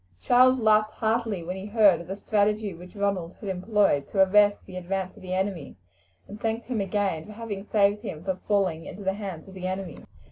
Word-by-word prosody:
Charles 255 - +5
laughed 215 -1 +3
heartily 220 -4 -1
when 180 +2 -4
he 190 +1 -7
heard 205 -5 +4
of 170 - -11
the 190 - -4
strategy 210 -1 0
which 180 +4 -13
Ronald 200 -4 -1
had 205 - -6
employed 190 -5 +1
to 195 -2 +4
arrest 205 +1 +4
the 185 - -11
advance 185 +1 -3
of 210 - -15
the 185 0 -4
enemy, 190 -6 -3 0.5
and 210 +1 -10
thanked 225 +1 -2
him 245 -3 -2
for - - +1
again 195 -3 -1
having 210 -2 -6
saved 205 0 +2
him 170 -8 -6
from 190 -1 -2
falling 185 -6 +1
into 200 - -8
the 190 0 0
hands 195 -5 -7
of 190 - -12
the 185 -1 -5
enemy. 185 -3 -5
200 Hz, 210 wpm, -26 LUFS, 185-210 Hz, 0.5 s, Charles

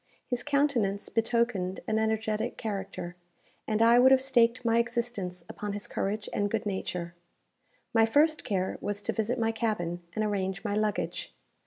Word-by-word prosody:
His 245 -2 -2
countenance 280 -9 +1
betokened 225 -5 0
an 220 0 +1
energetic 220 -1 -1
character, 195 -4 -4 0.5
and 215 +1 +2
I 235 +1 +7
would 255 +1 +7
have 265 - +7
staked 250 -2 +3
my 230 0 +4
existence 235 -7 -2
upon 205 -1 -5
his 205 0 -4
courage 205 +2 -2
and 205 0 +1
good 220 +1 -1
nature. 180 -3 -3 0.8
My 225 -1 +5
first 305 +6 +3
care 190 -2 -1
was 205 0 -2
to - - -1
visit 225 +3 -1
my 225 -1 +1
cabin, 190 -7 -2
and 215 0 +1
arrange 195 -1 -2
my 205 - 0
luggage. 210 0 -1
220 Hz, 160 wpm, -29 LUFS, 200-235 Hz, 0.8 s, I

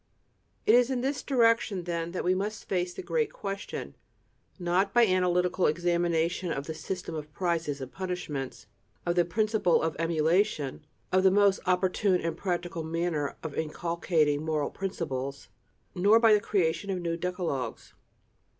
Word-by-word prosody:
It 215 - +5
is 245 +1 +5
in 255 -2 -1
this 270 +1 -1
direction, 230 -7 +2
then, 170 -1 -3
that 180 - -3
we 180 - +3
must 205 +3 -3
face 180 -1 0
the - - -7
great 460 -4 0
question, 195 0 -5 0.6
not 185 +3 0
by 240 -1 +7
analytical 180 -1 +2
examination 170 +1 0
of 140 -2 -3
the 160 - -4
system 180 +1 -5
of 150 -1 -6
prizes 165 -5 -1
and 130 -1 -6
punishments, 180 -8 -5 0.4
of 175 - +1
the 175 -1 +3
principle 215 -1 +2
of 160 -2 -1
emulation, 165 -2 +1 0.3
of 185 0 +4
the 190 - +6
most 200 0 +4
opportune 185 +1 +2
and 165 -1 -2
practical 175 -2 -3
manner 160 -2 -2
of 160 -3 -5
inculcating 160 -2 0
moral 155 -2 -1
principles, 140 -8 -4 0.4
nor 200 +5 +5
by 225 -2 +6
the 210 - +4
creation 195 -1 0
of 190 -2 -1
new 170 -1 -2
decalogues. 175 -7 -3
175 Hz, 150 wpm, -28 LUFS, 160-195 Hz, 0.6 s, by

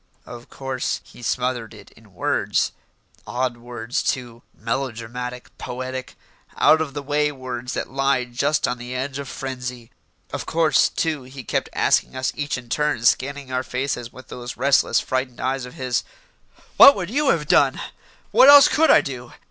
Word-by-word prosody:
Of 120 0 -11
course, 135 -2 -3
he - - -16
smothered 120 0 -2
it - - -15
in - - -21
words - - 0 0.6
odd 125 -1 -2
words, 120 0 -4
too 120 -2 -3
melodramatic, 125 +1 -5
poetic, 130 +1 -6 0.4
out 160 0 +5
of 145 -3 -4
the 145 - -4
way 150 +1 +1
words 130 -2 -6
that - - -3
lie 135 -1 +1
just 125 +5 0
on 125 - -3
the 125 +1 -6
edge 135 +2 -3
of 140 -2 -6
frenzy. 125 -3 -6 0.4
Of - - -4
course, 160 -4 +3
too, 160 -4 -1
he 130 +1 -10
kept - - -2
asking - - +1
us 130 0 -1
each 145 -2 -2
in 125 -1 -10
turn, 150 -2 -1
scanning 140 +2 +1
our 130 0 0
faces 125 -2 -3
with 130 +1 -14
those 120 -1 -7
restless, 135 -2 +3
frightened 130 -1 -3
eyes 130 0 -2
of 125 - -11
his, 125 -2 -1 0.7
"What 280 - +10
would 180 0 -4
you 285 +2 +1
have 150 - +1
done?" - - +4 0.5
"What 270 - +7
else 285 0 +10
could 320 +2 +3
I - - +7
do?" 125 -3 -7
130 Hz, 170 wpm, -22 LUFS, 125-140 Hz, 0.7 s, What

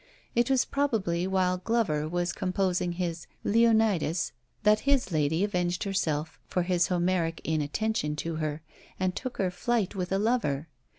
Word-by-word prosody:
It 240 +1 +2
was 265 -2 +3
probably 195 -11 0
while 185 -1 +1
Glover 180 -9 0
was 175 +1 -1
composing 185 -2 0
his 170 -3 -3 0.2
"Leonidas," 220 -7 +3 0.3
that 210 0 +5
his 270 -8 +2
lady 155 +3 +1
avenged 180 -3 0
herself 160 -6 -1
for 180 - 0
this 175 -1 +2
Homeric 175 -2 0
inattention 155 +2 -1
to 160 +2 -3
her, 155 -1 -3 0.4
and 185 -1 0
took 255 -1 -5
her 190 -2 +1
flight 220 +2 0
with 180 -1 -3
a 195 - +2
lover. 195 - 0
180 Hz, 150 wpm, -28 LUFS, 165-210 Hz, 0.4 s, that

